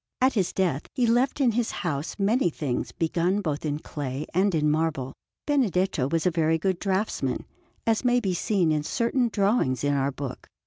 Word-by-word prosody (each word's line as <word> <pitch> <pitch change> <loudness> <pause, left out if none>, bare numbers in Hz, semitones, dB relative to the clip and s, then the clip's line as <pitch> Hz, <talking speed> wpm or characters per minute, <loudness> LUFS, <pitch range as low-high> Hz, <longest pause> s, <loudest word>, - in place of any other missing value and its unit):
At 260 +1 +3
his 195 -6 +1
death 170 -7 -1
he 250 -3 +2
left 245 +5 +2
in 260 -4 +4
his 230 +1 0
house 155 -5 -3
many 210 +2 +2
things 145 -5 -3
begun 175 +3 0
both 155 -7 -2
in 145 -2 -1
clay 145 -2 -5
and 190 +1 +2
in 150 -1 +2
marble. 150 -4 -1 0.3
Benedetto 190 - +1
was 165 +2 0
a 180 - +4
very 160 -1 +2
good 185 +2 -1
draughtsman, 195 +2 -1 0.4
as 225 +1 +2
may 245 0 +3
be 195 -6 -1
seen 180 -2 +1
in 155 -1 +1
certain 235 - 0
drawings 195 - +1
in 145 0 +2
our 140 0 +1
book. 130 -2 -7
180 Hz, 185 wpm, -26 LUFS, 150-220 Hz, 0.4 s, in